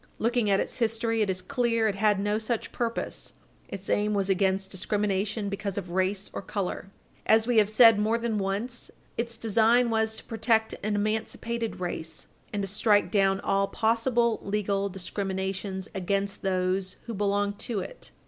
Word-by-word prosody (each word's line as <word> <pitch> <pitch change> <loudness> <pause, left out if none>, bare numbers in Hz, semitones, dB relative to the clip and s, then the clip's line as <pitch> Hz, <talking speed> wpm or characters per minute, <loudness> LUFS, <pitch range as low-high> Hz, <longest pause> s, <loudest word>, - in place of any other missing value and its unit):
Looking 235 -1 +1
at 195 0 +4
its - - -2
history, 225 -1 +1
it 210 - +1
is 185 -1 -1
clear 235 -5 +1
it 210 - +1
had 205 0 +2
no 205 +2 0
such 225 +1 -2
purpose. 235 -1 -3 0.3
Its 195 0 -7
aim 210 0 +1
was 195 -1 +1
against 190 0 +1
discrimination 205 +2 -1
because 200 0 -3
of 185 -3 -4
race 190 +2 0
or - - -4
color. 195 -1 -4 0.4
As 220 0 +5
we 245 -1 +1
have 210 -1 +5
said 225 -1 +7
more 220 +2 +2
than 230 -2 -1
once, 205 +5 -3 0.3
its 235 0 -3
design 230 +2 +3
was 220 0 +1
to - - -9
protect 220 0 +1
an 210 0 -1
emancipated 220 +2 -2
race, 160 -3 -4 0.3
and 205 -1 -2
to - - -2
strike 210 +1 +2
down 195 -1 +3
all 195 0 +1
possible 235 +1 +1
legal 200 -1 -1
discriminations 190 0 -3
against 195 +1 -1
those 185 0 0
who 235 - -5
belong 205 0 0
to 225 -1 -3
it. - - -9
205 Hz, 165 wpm, -27 LUFS, 195-225 Hz, 0.4 s, said